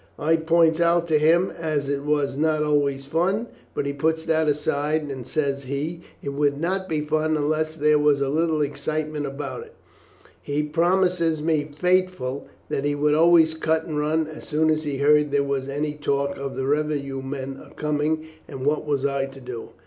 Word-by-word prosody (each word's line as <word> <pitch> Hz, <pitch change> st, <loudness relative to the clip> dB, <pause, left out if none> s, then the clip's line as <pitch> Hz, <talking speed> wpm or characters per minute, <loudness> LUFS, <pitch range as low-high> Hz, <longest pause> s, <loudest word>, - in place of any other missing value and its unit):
I 160 Hz, +2 st, +2 dB
points 165 Hz, 0 st, +3 dB
out 170 Hz, 0 st, +3 dB
to 155 Hz, -1 st, +4 dB
him 170 Hz, +4 st, +3 dB
as 155 Hz, -4 st, -2 dB
it 140 Hz, 0 st, -1 dB
was 145 Hz, -2 st, 0 dB
not 155 Hz, +1 st, +1 dB
always 140 Hz, -2 st, +1 dB
fun, 180 Hz, -, 0 dB, 0.3 s
but -, -, -1 dB
he 140 Hz, -, -2 dB
puts 160 Hz, +3 st, 0 dB
that 160 Hz, -1 st, +2 dB
aside, 150 Hz, +1 st, 0 dB
and, 130 Hz, -3 st, -7 dB
says 140 Hz, -3 st, -1 dB
he, 150 Hz, +6 st, -3 dB, 0.2 s
it 140 Hz, -, -3 dB
would 140 Hz, 0 st, 0 dB
not 190 Hz, +3 st, -2 dB
be 155 Hz, -2 st, 0 dB
fun 155 Hz, +1 st, 0 dB
unless 155 Hz, +1 st, 0 dB
there 150 Hz, -1 st, +3 dB
was 145 Hz, -1 st, +3 dB
a 140 Hz, -, 0 dB
little 160 Hz, +1 st, +1 dB
excitement 150 Hz, +1 st, -3 dB
about 140 Hz, -, -5 dB
it. 465 Hz, 0 st, -17 dB, 0.7 s
He 145 Hz, +1 st, -1 dB
promised 175 Hz, +3 st, +2 dB, 0.2 s
me 155 Hz, -2 st, 0 dB
faithful 180 Hz, -5 st, 0 dB, 0.2 s
that 135 Hz, -, -2 dB
he 145 Hz, 0 st, 0 dB
would 150 Hz, +1 st, +2 dB
always 160 Hz, 0 st, +5 dB
cut 160 Hz, 0 st, 0 dB
and 155 Hz, -, -5 dB
run 155 Hz, +2 st, +1 dB
as 155 Hz, 0 st, -10 dB
soon 155 Hz, +1 st, +2 dB
as 155 Hz, 0 st, -1 dB
he 145 Hz, -2 st, -2 dB
heard 150 Hz, +1 st, +4 dB
there 140 Hz, 0 st, +2 dB
was 140 Hz, -1 st, -2 dB
any 145 Hz, +2 st, -2 dB
talk 140 Hz, -1 st, -1 dB
of 140 Hz, 0 st, -5 dB
the 130 Hz, -, -2 dB
revenue 145 Hz, -2 st, -1 dB
men 135 Hz, 0 st, -6 dB
a -, -, -15 dB
coming, 150 Hz, +1 st, -1 dB, 0.2 s
and 130 Hz, 0 st, -6 dB
what 150 Hz, +1 st, 0 dB
was 140 Hz, -2 st, 0 dB
I 140 Hz, -1 st, 0 dB
to 135 Hz, 0 st, -12 dB
do? 125 Hz, -3 st, -7 dB
150 Hz, 195 wpm, -24 LUFS, 140-160 Hz, 0.7 s, always